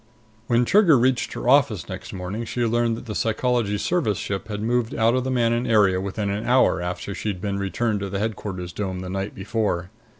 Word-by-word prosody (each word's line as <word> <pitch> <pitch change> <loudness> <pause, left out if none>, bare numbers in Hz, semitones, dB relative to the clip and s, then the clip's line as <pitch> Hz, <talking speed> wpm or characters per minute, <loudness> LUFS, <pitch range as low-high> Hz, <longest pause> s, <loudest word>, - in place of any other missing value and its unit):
When 120 0 +3
Trigger 180 - +5
reached 125 +1 +1
her - - -5
office 125 - +3
next - - -7
morning, 95 +5 -4
she 120 +1 -2
learned 115 0 +1
that - - -9
the 110 - -5
Psychology 110 -1 0
Service 110 - 0
ship 100 +1 -4
had 105 -2 -4
moved 120 0 0
out 115 +1 +3
of 130 0 +1
the 130 - -2
Manon 120 -1 +1
area 100 -4 +4
within 100 +1 -2
an 105 +2 -2
hour 125 -6 +3
after 90 +3 -4
she'd 100 -2 -3
been 100 +1 -2
returned 105 +2 -1
to 100 0 -4
the 100 - -3
Headquarters 95 -4 -4
dome 95 -2 -3
the 90 - -6
night 95 +1 -3
before. 95 -3 -2
110 Hz, 205 wpm, -23 LUFS, 100-120 Hz, -, Trigger